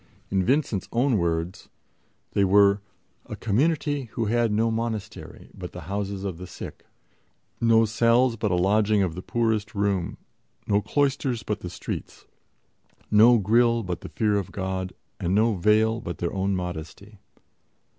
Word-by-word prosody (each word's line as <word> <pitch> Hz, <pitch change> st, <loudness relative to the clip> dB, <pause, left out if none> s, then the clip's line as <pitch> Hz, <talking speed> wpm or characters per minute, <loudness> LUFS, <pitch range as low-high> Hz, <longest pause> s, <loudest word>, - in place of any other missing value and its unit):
In 95 Hz, -1 st, +2 dB
Vincent's 130 Hz, -4 st, 0 dB
own 120 Hz, -2 st, +2 dB
words, 85 Hz, +1 st, -2 dB, 0.6 s
they 100 Hz, -, +2 dB
were 100 Hz, +1 st, +5 dB, 0.5 s
"a -, -, -6 dB
community 145 Hz, +4 st, 0 dB
who 115 Hz, -, -1 dB
had 115 Hz, +1 st, +1 dB
no 115 Hz, +2 st, +1 dB
monastery 110 Hz, -2 st, -5 dB
but 90 Hz, -1 st, -8 dB
the 90 Hz, -, -7 dB
houses 100 Hz, +3 st, -4 dB
of 95 Hz, -4 st, -4 dB
the 90 Hz, -, -7 dB
sick, -, -, -10 dB, 0.7 s
no 115 Hz, -1 st, +4 dB
cells 115 Hz, +2 st, +3 dB
but 110 Hz, -1 st, -1 dB
a 90 Hz, -, +1 dB
lodging 105 Hz, +3 st, +3 dB
of 90 Hz, -4 st, -1 dB
the 90 Hz, -, -6 dB
poorest 110 Hz, -1 st, -1 dB
room, 100 Hz, -3 st, -1 dB, 0.5 s
no 100 Hz, 0 st, +2 dB
cloisters 135 Hz, -3 st, 0 dB
but 105 Hz, -1 st, -3 dB
the 90 Hz, -, -6 dB
streets, 90 Hz, -, -7 dB, 0.9 s
no 115 Hz, +3 st, +7 dB
grille 115 Hz, +3 st, +3 dB
but 90 Hz, -3 st, -4 dB
the -, -, -8 dB
fear 105 Hz, -3 st, +1 dB
of 95 Hz, -1 st, -6 dB
God, 95 Hz, -1 st, -3 dB, 0.3 s
and 90 Hz, +3 st, 0 dB
no 110 Hz, +2 st, +3 dB
veil 110 Hz, +4 st, +2 dB
but 85 Hz, -, -5 dB
their 85 Hz, -, -3 dB
own 95 Hz, 0 st, 0 dB
modesty." 90 Hz, +4 st, -6 dB
105 Hz, 155 wpm, -25 LUFS, 95-115 Hz, 0.9 s, no